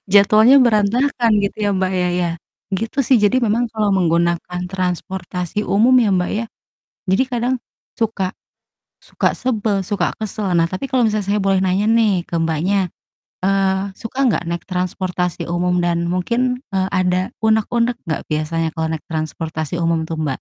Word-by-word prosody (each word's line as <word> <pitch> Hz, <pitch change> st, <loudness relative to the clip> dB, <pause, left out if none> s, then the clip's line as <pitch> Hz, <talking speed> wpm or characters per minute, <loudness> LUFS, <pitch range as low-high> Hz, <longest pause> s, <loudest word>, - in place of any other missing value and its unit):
Jadwalnya 215 Hz, +6 st, +6 dB
berantakan 235 Hz, +2 st, +2 dB
gitu 200 Hz, -, -2 dB
ya 205 Hz, -, +2 dB
Mbak, 190 Hz, 0 st, 0 dB
ya 180 Hz, -1 st, +1 dB
ya? 175 Hz, -, 0 dB, 0.4 s
Gitu 225 Hz, +7 st, -4 dB
sih. 260 Hz, 0 st, +4 dB
Jadi 210 Hz, +4 st, +3 dB
memang 235 Hz, +2 st, +1 dB
kalau 215 Hz, -2 st, 0 dB
menggunakan 170 Hz, 0 st, 0 dB
transportasi 180 Hz, +1 st, -3 dB
umum 225 Hz, +6 st, +4 dB
ya 225 Hz, -4 st, +3 dB
Mbak, 180 Hz, -1 st, 0 dB
ya, 220 Hz, +2 st, -1 dB, 0.6 s
jadi 190 Hz, +7 st, +3 dB
kadang 245 Hz, 0 st, -1 dB, 0.4 s
suka 205 Hz, -5 st, -1 dB, 0.7 s
suka -, -, -1 dB
sebel, 215 Hz, -5 st, -1 dB
suka 200 Hz, +2 st, -1 dB
kesel. 215 Hz, -1 st, -4 dB
Nah, 165 Hz, -1 st, +4 dB
tapi 185 Hz, +10 st, -4 dB
kalau 260 Hz, -2 st, +1 dB
misalnya 215 Hz, -3 st, 0 dB
saya 205 Hz, +1 st, +1 dB
boleh 195 Hz, -1 st, +2 dB
nanya 190 Hz, +2 st, +1 dB
nih 215 Hz, -6 st, +3 dB
ke 170 Hz, -, -3 dB
Mbaknya, 170 Hz, +4 st, 0 dB, 0.6 s
eee, 195 Hz, 0 st, +2 dB, 0.2 s
suka 230 Hz, +3 st, -8 dB
nggak 220 Hz, -, +1 dB
naik 170 Hz, 0 st, -3 dB
transportasi 180 Hz, -1 st, -2 dB
umum 180 Hz, +1 st, +1 dB
dan 170 Hz, 0 st, 0 dB
mungkin, 245 Hz, +8 st, -1 dB
eee, 190 Hz, -1 st, 0 dB
ada 185 Hz, -1 st, +2 dB, 0.2 s
unek-unek 230 Hz, +2 st, +2 dB
nggak 155 Hz, -, -2 dB
biasanya 160 Hz, +2 st, -1 dB
kalau 160 Hz, 0 st, -2 dB
naik 155 Hz, -, -9 dB
transportasi 160 Hz, 0 st, -3 dB
umum 165 Hz, -1 st, +1 dB
tuh, 165 Hz, -, -4 dB
Mbak? 155 Hz, -1 st, -1 dB
190 Hz, 160 wpm, -19 LUFS, 175-220 Hz, 0.7 s, Jadwalnya